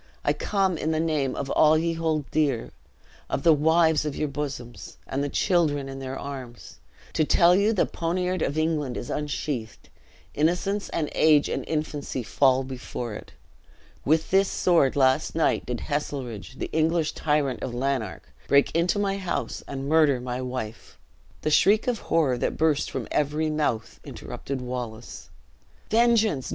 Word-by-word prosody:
I - - +2
come 190 -5 0
in 155 - -1
the 160 -1 0
name 155 -5 0
of 140 -1 -4
all 155 0 +5
ye 165 +1 0
hold 160 -3 -1
dear, 140 -7 0 0.6
of - - -2
the 165 - +7
wives 160 +1 +3
of 150 -2 -3
you 150 - -1
bosoms, 130 -7 -6
and 135 +2 -2
the 145 - -2
children 150 -6 +1
in 135 0 -7
their 135 0 -5
arms, 130 -4 -8 0.3
to - - +2
tell 170 +3 +5
you 200 +3 +3
the 210 - +2
poniard 180 +1 -2
of 145 - -1
England 155 -5 0
is - - -5
unsheathed 140 -5 -4 0.4
innocence 180 +6 0
and 155 -3 -2
age 150 -2 +4
and - - -2
infancy 150 -4 -3
fall 130 +2 +3
before 125 -3 -6
it. 105 - -10 0.7
With 160 +2 +1
this 195 +1 +4
sword, 165 -7 +2
last 135 +3 +2
night, 165 - +1
did 125 -1 -3
Heselrigge, 130 - -4
the - - -5
English 160 0 +1
tyrant 150 -3 0
of 120 -2 -4
Lanark, 130 -3 -2 0.2
break 140 +2 +3
into 170 +4 +2
my 200 -1 0
house, 185 -3 -3
and 135 0 -5
murder 150 -4 +4
my 125 0 -4
wife!" 125 -4 -6 0.5
The 155 - 0
shriek 205 +7 +4
of 240 -3 0
horror 135 -7 +2
that - - -1
burst 155 -2 +1
from - - -4
every 150 +2 0
mouth, 145 -7 -2
interrupted 135 -1 -6
Wallace. 125 -2 -6 0.6
"Vengeance! 220 - +3
150 Hz, 160 wpm, -25 LUFS, 130-165 Hz, 0.7 s, the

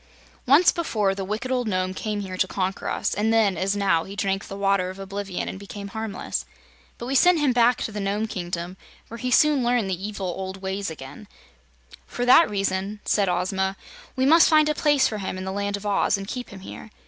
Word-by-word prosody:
"Once 295 +7 +6
before 215 - 0
the 195 0 -4
wicked 215 +6 -4
old 250 -2 0
Nome 185 -2 -1
came 210 +1 -3
here 190 -2 -6
to 185 - +1
conquer 190 0 -2
us, - - -1
and 215 +2 0
then, 220 -4 +3
as 190 +4 0
now, 190 -5 +2
he 195 - -9
drank 195 -1 -1
of - - -12
the 195 - -6
Water 195 -2 +1
of 185 - -8
Oblivion 195 -1 -5
and 190 - -6
became 200 0 -8
harmless. 220 -2 -4 0.5
But 235 - -7
we 260 - -3
sent 355 +5 +5
him 285 -4 +2
back 240 0 +3
to - - -4
the 210 - -5
Nome 200 +2 -1
Kingdom, 180 -3 -5 0.3
where 230 - -8
he 255 - -2
soon 295 -1 +4
learned 240 -5 +1
the - - +1
old 180 - -5
evil 190 -2 -4
ways 190 0 -3
again. 160 - -10 0.8
"For 245 - -3
that 290 +7 +7
reason," 195 0 -2
said 200 -3 +2
Ozma, 190 +2 -1 0.4
"we 260 0 +1
must 325 +4 +6
find 310 -1 +5
a - - +2
place 290 -3 +3
for 215 - -4
him 190 -1 -4
in 185 - -5
the 190 - -3
Land 200 +1 -2
of 200 - -11
Oz, 200 0 +2
and 195 0 -7
keep 250 +2 -5
him 195 -1 -11
here. 205 - -10
200 Hz, 225 wpm, -24 LUFS, 190-235 Hz, 0.8 s, that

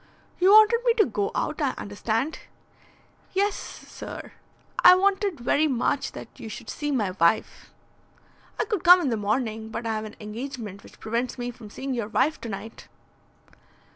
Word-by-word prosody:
"You 370 +1 +5
wanted 435 +2 +7
me 475 -2 +3
to 430 -3 +4
go 205 -6 -1
out, 305 - -2
I 275 -3 0
understand?" 225 +8 -2 0.9
"Yes, 400 +1 +2
sir. - - -9 0.5
I 365 - +10
wanted 390 -3 +1
very 285 +6 +2
much 250 -4 -1
that - - -11
you 225 - -7
should 220 +1 -7
see 295 -1 -4
my 215 -9 0
wife." 180 +2 0 0.9
"I - - +1
could 415 -5 -2
come 360 0 +9
in 290 - 0
the 230 - 0
morning, 220 +1 -2
but 230 +1 -5
I 225 - 0
have 215 0 -3
an 215 - -9
engagement 215 -2 -7
which - - -17
prevents 235 +4 -2
me 245 0 -3
from 230 -3 -12
seeing 265 +5 -5
your 235 -4 -2
wife 265 +8 +1
to 230 - -6
night." 220 +3 -8
245 Hz, 170 wpm, -25 LUFS, 220-330 Hz, 0.9 s, I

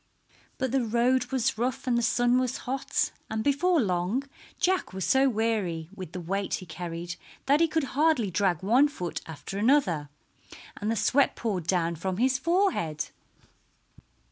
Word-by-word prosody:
But 260 -2 -1
the 265 -1 +2
road 240 +3 +2
was 260 -3 0
rough 250 +2 -1
and 250 -2 +1
the 235 - +2
sun 245 +1 +3
was 255 0 -1
hot, 265 +1 -1 0.2
and 220 0 -2
before 320 +6 +3
long 190 +3 0 0.4
Jack 370 - +1
was 190 -1 -3
so 265 +1 +4
weary 210 -8 -1
with 185 -5 -8
the 180 - -5
weight 195 +3 -2
he 185 - -7
carried 170 +1 -6 0.3
that 285 +2 +4
he 330 - +4
could 320 -1 0
hardly 285 - +2
drag 185 -2 +1
one 245 +9 +5
foot 180 - -5
after 165 +5 -6
another, 205 - +2 0.7
and 210 - -2
the 225 - +1
sweat 255 +6 +2
poured 190 -8 -3
down 170 -2 +1
from 185 +3 -3
his 255 +3 +2
forehead. 325 - 0
225 Hz, 165 wpm, -27 LUFS, 180-265 Hz, 0.7 s, one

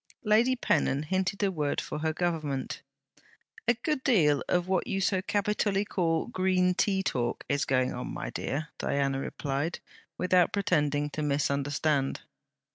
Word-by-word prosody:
Lady 230 +4 +4
Pennon 145 - +1
hinted 190 +5 -1
a 195 - +2
word 150 -5 -1
for - - -4
her 160 +1 0
Government. 155 -6 -2 0.9
'A 240 - +4
good 300 -2 0
deal 155 - +4
of 180 0 +1
what 185 -2 0
you 195 - -1
so 190 -1 +1
capitally 205 0 0
call 165 -5 0
"Green 185 -1 +2
tea 190 +1 +1
talk" 120 -9 -2
is 140 0 0
going 130 -1 +1
on, - - -5
my - - -5
dear.' 150 +2 -3
Diana 140 -1 0
replied, 140 +4 -3 0.4
without 180 -1 +3
pretending 150 -7 +1
to 155 - -4
misunderstand. 140 0 0
165 Hz, 145 wpm, -29 LUFS, 145-195 Hz, 0.9 s, Lady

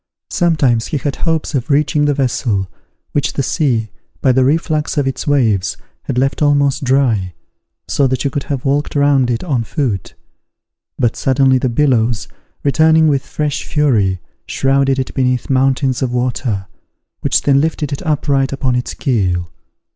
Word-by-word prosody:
Sometimes 140 -10 +2
he 150 - -2
had 140 0 -3
hopes 165 -2 -1
of 135 +1 -2
reaching 150 +1 +2
the 145 -1 +1
vessel, 120 -7 0 0.4
which 145 - -1
the 140 - -1
sea, 120 -7 0 0.3
by 130 - +3
the 130 +1 +3
reflux 155 +2 0
of 145 - +2
its 135 - -3
waves, 115 -10 +1 0.3
had - - -3
left 135 +3 0
almost 145 -1 +2
dry, 120 -9 +1 0.5
so 140 - +2
that 130 -1 -1
you 140 - -1
could 145 0 -2
have 140 -2 -4
walked 145 +2 0
round 140 -3 +3
it 120 -1 -1
on 135 -10 -1
foot; 115 - -3 0.8
but 120 -2 +1
suddenly 130 -1 +2
the 130 - 0
billows, 120 -4 +1 0.4
returning 160 +2 +4
with 140 -2 +1
fresh 150 -1 -3
fury, 110 - +1 0.3
shrouded 135 0 +1
it 130 -1 -3
beneath 125 -1 0
mountains 130 0 +1
of 130 -2 0
water, 120 -5 -1 0.5
which - - +1
then 140 -1 +3
lifted 155 -2 -2
it 140 - -5
upright 145 -5 0
upon 130 -2 -1
its 125 - -3
keel. 90 - -1
135 Hz, 160 wpm, -16 LUFS, 125-145 Hz, 0.8 s, returning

